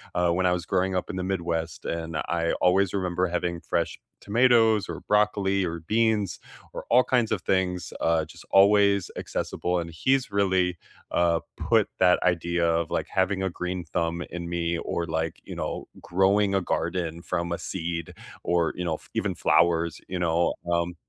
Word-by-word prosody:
uh, 90 Hz, -1 st, +2 dB
when 90 Hz, +2 st, +1 dB
I 90 Hz, -, +4 dB
was 90 Hz, -1 st, -1 dB
growing 95 Hz, +1 st, 0 dB
up 90 Hz, -, -3 dB
in -, -, -4 dB
the 90 Hz, -, -2 dB
Midwest, 85 Hz, -3 st, -3 dB
and 80 Hz, -1 st, -3 dB
I 85 Hz, +2 st, -1 dB
always 95 Hz, +1 st, +3 dB
remember 90 Hz, -2 st, 0 dB
having 85 Hz, -1 st, -2 dB
fresh -, -, -1 dB, 0.2 s
tomatoes, 115 Hz, -1 st, +3 dB
or -, -, -5 dB
broccoli 100 Hz, -2 st, +2 dB
or 85 Hz, -1 st, -3 dB
beans, 105 Hz, +2 st, 0 dB, 0.3 s
or -, -, -6 dB
all 125 Hz, +2 st, +6 dB
kinds 120 Hz, -4 st, +1 dB
of 105 Hz, -4 st, 0 dB
things, 90 Hz, -1 st, -1 dB
uh, 80 Hz, -1 st, +2 dB
just 75 Hz, -, -14 dB
always 100 Hz, -1 st, +5 dB
accessible, 90 Hz, 0 st, -2 dB
and 85 Hz, 0 st, -5 dB
he's 130 Hz, +10 st, +1 dB
really, 95 Hz, -3 st, +1 dB, 0.3 s
uh, 85 Hz, -1 st, +2 dB, 0.2 s
put -, -, +2 dB
that 90 Hz, -1 st, +5 dB
idea 85 Hz, -1 st, +1 dB
of, 85 Hz, 0 st, 0 dB
like, -, -, -1 dB
having 95 Hz, +1 st, 0 dB
a 95 Hz, -, 0 dB
green 90 Hz, 0 st, -4 dB
thumb 85 Hz, 0 st, -2 dB
in 85 Hz, -1 st, -6 dB
me, 85 Hz, 0 st, -1 dB
or 85 Hz, -, -2 dB
like, 80 Hz, 0 st, -2 dB
you -, -, -7 dB
know, -, -, -4 dB
growing 95 Hz, +3 st, +2 dB
a 95 Hz, -, +3 dB
garden 85 Hz, -1 st, -2 dB
from 85 Hz, -1 st, -2 dB
a -, -, -2 dB
seed, 85 Hz, -2 st, -4 dB, 0.3 s
or, 85 Hz, -2 st, +1 dB
you 90 Hz, -, -3 dB
know, 85 Hz, -2 st, -1 dB
f -, -, -13 dB
even -, -, -1 dB
flowers, 85 Hz, -1 st, +2 dB
you 95 Hz, -, -4 dB
know, 85 Hz, 0 st, +2 dB, 0.2 s
um 85 Hz, +1 st, 0 dB
90 Hz, 180 wpm, -26 LUFS, 85-95 Hz, 0.3 s, all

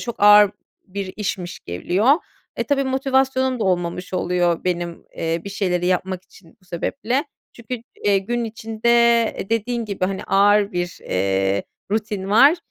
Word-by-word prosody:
çok 235 Hz, -4 st, -6 dB
ağır 210 Hz, -1 st, +8 dB, 0.4 s
bir 195 Hz, 0 st, -5 dB
işmiş 190 Hz, -4 st, -4 dB
geliyor. 180 Hz, -, +1 dB, 0.4 s
E, -, -, -1 dB
tabii 275 Hz, -1 st, +1 dB
motivasyonum 265 Hz, -1 st, +1 dB
da -, -, +1 dB
olmamış 180 Hz, 0 st, -1 dB
oluyor 175 Hz, -1 st, 0 dB
benim, 175 Hz, -1 st, -3 dB
eee, 165 Hz, 0 st, -1 dB
bir 200 Hz, -, -6 dB
şeyleri 180 Hz, -3 st, -1 dB
yapmak 185 Hz, 0 st, -1 dB
için 180 Hz, -3 st, -20 dB
bu -, -, -27 dB
sebeple. 240 Hz, -, -2 dB, 0.3 s
Çünkü, 235 Hz, 0 st, -6 dB, 0.2 s
eee, 200 Hz, -1 st, +4 dB
gün 235 Hz, +5 st, -2 dB
içinde, 225 Hz, +1 st, -4 dB, 0.5 s
eee, -, -, -5 dB
dediğin 230 Hz, +1 st, -1 dB
gibi, 200 Hz, -3 st, -2 dB
hani, 190 Hz, 0 st, -3 dB
ağır 205 Hz, +1 st, +3 dB
bir, 175 Hz, -1 st, -3 dB
eee, 95 Hz, +1 st, 0 dB, 0.3 s
rutin 210 Hz, -2 st, -2 dB
var. 280 Hz, +10 st, +6 dB
200 Hz, 150 wpm, -21 LUFS, 180-230 Hz, 0.5 s, ağır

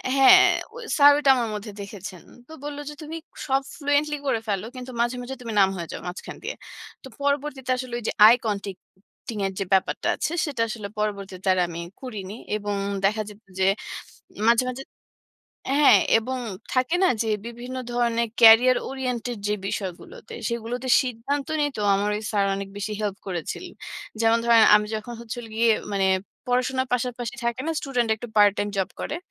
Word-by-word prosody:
হ্যাঁ, 270 Hz, -1 st, +8 dB, 0.3 s
ঐ -, -, -10 dB, 0.2 s
স্যার 290 Hz, -1 st, +9 dB
ওইটা 285 Hz, -2 st, +2 dB
আমার 235 Hz, -3 st, -1 dB
মধ্যে 210 Hz, +1 st, -6 dB
দেখেছেন। 200 Hz, -2 st, -9 dB, 0.2 s
তো -, -, -16 dB
বলল 290 Hz, 0 st, -5 dB
যে, -, -, -7 dB
"তুমি 320 Hz, +2 st, -6 dB, 0.3 s
সব 270 Hz, 0 st, +2 dB, 0.2 s
ফ্লুয়েন্টলি 290 Hz, +1 st, +1 dB
করে 230 Hz, -, +1 dB
ফেলো। 200 Hz, 0 st, -1 dB
কিন্তু 255 Hz, 0 st, -7 dB
মাঝে, 240 Hz, +1 st, 0 dB
মাঝে 255 Hz, +2 st, -6 dB
তুমি 230 Hz, -3 st, -5 dB
নাম্ব 195 Hz, 0 st, +5 dB
হয়ে 170 Hz, -2 st, -6 dB
যাও -, -, -6 dB
মাঝখান 180 Hz, +1 st, -7 dB
দিয়ে।" -, -, -4 dB, 0.5 s
তো -, -, -9 dB
পরবর্তীতে 280 Hz, -2 st, -1 dB
আসলে 255 Hz, -1 st, -6 dB
ওই 240 Hz, -, -11 dB
যে -, -, +1 dB, 0.2 s
আই 230 Hz, -, +8 dB
কনটাক্টিং 200 Hz, +1 st, -7 dB
এর 195 Hz, -, -1 dB
যে 195 Hz, -, -1 dB
ব্যাপারটা 190 Hz, -, +1 dB
আছে, -, -, -2 dB
সেটা 280 Hz, -6 st, -3 dB
আসলে 215 Hz, -2 st, -5 dB
পরবর্তীতে 195 Hz, -3 st, -3 dB, 0.2 s
আমি 170 Hz, 0 st, -6 dB, 0.2 s
করিনি। 210 Hz, -6 st, -6 dB, 0.2 s
এবং 205 Hz, -1 st, -3 dB, 0.3 s
দেখা 215 Hz, +2 st, +2 dB
যেত 205 Hz, -, -13 dB, 0.2 s
যে 190 Hz, -, +3 dB, 0.8 s
মাঝে, 235 Hz, +1 st, +5 dB
মাঝে 255 Hz, +2 st, -6 dB, 0.9 s
হ্যাঁ, 280 Hz, -7 st, +7 dB, 0.2 s
এবং 255 Hz, +3 st, -3 dB, 0.3 s
থাকে 255 Hz, +6 st, +1 dB
না? 375 Hz, -, +5 dB
যে, 225 Hz, -, -3 dB, 0.2 s
বিভিন্ন 240 Hz, +2 st, -7 dB, 0.2 s
ধরণের 235 Hz, -1 st, +1 dB
কেরিয়ার 235 Hz, +3 st, +8 dB
ওরিয়েন্টেড 250 Hz, -3 st, -3 dB
যে 210 Hz, -, +1 dB
বিষয়গুলোতে, 195 Hz, -, -6 dB
সেগুলোতে 235 Hz, +2 st, -4 dB
সিদ্ধান্ত 265 Hz, +3 st, -3 dB
নিয়ে 290 Hz, -1 st, +1 dB
তো -, -, -1 dB
আমার 200 Hz, +1 st, 0 dB
ওই 210 Hz, -, -5 dB
স্যার, 200 Hz, -2 st, +2 dB
অনেক 195 Hz, 0 st, -5 dB
বেশি 205 Hz, +1 st, -3 dB
হেল্প 205 Hz, -2 st, -2 dB
করেছিলেন। 185 Hz, -, -5 dB, 0.5 s
যেমন 225 Hz, 0 st, +4 dB
ধরেন 230 Hz, -1 st, +6 dB
আমি 210 Hz, -, 0 dB
যখন 215 Hz, +3 st, -7 dB
হচ্ছিল 235 Hz, +1 st, -6 dB
গিয়ে 230 Hz, 0 st, +3 dB, 0.8 s
পড়াশোনার 260 Hz, +1 st, 0 dB
পাশাপাশি 245 Hz, 0 st, -3 dB
থাকে 235 Hz, +2 st, -1 dB
না, 325 Hz, -, 0 dB
স্টুডেন্ট 250 Hz, -5 st, -1 dB
একটু 240 Hz, +3 st, -8 dB
পার্ট 205 Hz, -1 st, +7 dB
টাইম 205 Hz, -, 0 dB
জব 190 Hz, -, 0 dB
করে? 305 Hz, -, -3 dB
235 Hz, 170 wpm, -24 LUFS, 205-260 Hz, 0.9 s, স্যার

